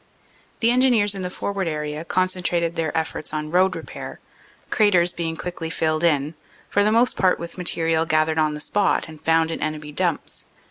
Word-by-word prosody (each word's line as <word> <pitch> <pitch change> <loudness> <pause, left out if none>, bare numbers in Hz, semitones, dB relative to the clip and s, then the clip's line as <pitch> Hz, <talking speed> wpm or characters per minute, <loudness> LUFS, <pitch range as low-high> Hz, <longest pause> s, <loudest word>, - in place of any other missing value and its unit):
"The 230 0 +4
Engineers 245 -5 +4
in 195 - -5
the 180 - -3
forward 195 0 -3
area 150 0 -3
concentrated 175 -1 0
their 165 -1 -1
efforts 160 -1 -3
on 155 0 -3
road 185 +2 +3
repair, - - -8 0.5
craters 185 -5 +4
being 165 -2 -4
quickly 175 -2 -5
filled 155 0 0
in, 150 -2 +2 0.4
for 205 - +3
the 210 - +3
most 235 +3 +3
part 185 -2 +3
with 170 0 -7
material 165 -2 0
gathered 155 0 +2
on 155 -1 +1
the - - -6
spot 205 +5 +1
and 155 -1 -12
found 160 0 +2
in - - -4
enemy 155 -1 -3
dumps. 175 +1 -1
165 Hz, 180 wpm, -23 LUFS, 155-185 Hz, 0.5 s, The